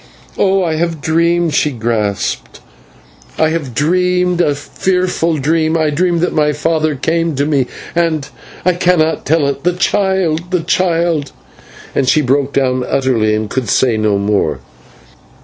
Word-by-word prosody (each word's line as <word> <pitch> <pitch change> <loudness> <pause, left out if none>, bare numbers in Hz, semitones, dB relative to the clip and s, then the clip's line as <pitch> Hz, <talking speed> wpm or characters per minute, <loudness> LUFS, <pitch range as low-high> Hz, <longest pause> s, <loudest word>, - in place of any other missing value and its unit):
"Oh! 195 -1 +2
I 160 -2 -1
have 165 -1 -1
dreamed," 170 +2 +1
she 150 - +2
gasped. 105 - -2 0.8
"I 160 - +3
have 155 -7 -4
dreamed 180 +3 +1
a 145 -4 +1
fearful 175 +2 -1
dream. 160 +3 +1
I 155 -2 +1
dreamed 170 +2 +1
that 175 - 0
my 150 -1 +2
father 155 0 0
came 165 +3 -1
to 140 +2 0
me, 140 -4 +1 0.3
and 165 -4 0 0.4
I 180 - +4
cannot 175 -2 +1
tell 155 0 +2
it 140 - -3
the 180 +1 +2
child 180 -3 0
the 180 -2 0
child 170 -3 0 0.3
" - - -20
and 130 -2 +1
she 155 +3 +4
broke 135 +1 +1
down 130 -2 0
utterly, 120 -5 +1
and 110 0 -2
could 120 0 -3
say 125 -4 +2
no 110 -2 +1
more. 100 -8 0
155 Hz, 155 wpm, -15 LUFS, 135-170 Hz, 0.8 s, I